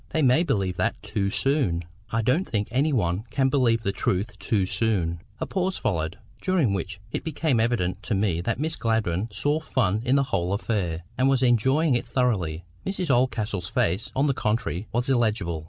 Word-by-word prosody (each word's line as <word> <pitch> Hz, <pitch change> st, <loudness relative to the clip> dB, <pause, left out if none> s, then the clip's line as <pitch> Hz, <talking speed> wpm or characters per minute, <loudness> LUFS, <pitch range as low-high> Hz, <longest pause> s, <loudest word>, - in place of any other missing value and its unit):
"They 160 Hz, -, 0 dB
may 130 Hz, +4 st, +5 dB
believe 95 Hz, -, 0 dB
that -, -, 0 dB
too 100 Hz, -1 st, -1 dB
soon." 100 Hz, -, +1 dB, 0.2 s
"I 115 Hz, 0 st, 0 dB
don't 140 Hz, -, +1 dB
think 105 Hz, -2 st, -1 dB
any 140 Hz, +6 st, +2 dB
one 100 Hz, -4 st, 0 dB
can 135 Hz, -1 st, +2 dB
believe 120 Hz, -4 st, +2 dB
the 100 Hz, -, +1 dB
truth 100 Hz, +2 st, -1 dB
too 100 Hz, -1 st, +1 dB
soon." 90 Hz, -6 st, 0 dB, 0.2 s
A -, -, -1 dB
pause 185 Hz, 0 st, -1 dB
followed, 80 Hz, -1 st, -1 dB, 0.2 s
during 170 Hz, -, +2 dB
which 95 Hz, +1 st, -4 dB
it -, -, -3 dB
became 155 Hz, -5 st, 0 dB
evident 100 Hz, -5 st, 0 dB
to 110 Hz, -, 0 dB
me 95 Hz, -4 st, +1 dB
that 115 Hz, +7 st, -2 dB
Miss 160 Hz, +2 st, -1 dB
Gladwyn 110 Hz, -3 st, 0 dB
saw 145 Hz, +10 st, +1 dB
fun 110 Hz, -9 st, 0 dB
in 125 Hz, +2 st, +2 dB
the 140 Hz, -, +4 dB
whole 90 Hz, +2 st, +1 dB
affair, 95 Hz, -6 st, -1 dB, 0.2 s
and 130 Hz, +1 st, +4 dB
was 135 Hz, -1 st, +2 dB
enjoying 130 Hz, +5 st, +3 dB
it 120 Hz, -, -1 dB
thoroughly. 90 Hz, -, 0 dB, 0.2 s
Mrs 185 Hz, -5 st, -1 dB
Oldcastle's 110 Hz, -7 st, 0 dB
face, 90 Hz, +6 st, 0 dB
on 135 Hz, +2 st, +2 dB
the 140 Hz, -, +2 dB
contrary, 110 Hz, -4 st, -1 dB
was 120 Hz, +3 st, 0 dB
illegible. 110 Hz, -10 st, +1 dB
115 Hz, 190 wpm, -25 LUFS, 95-135 Hz, 0.2 s, may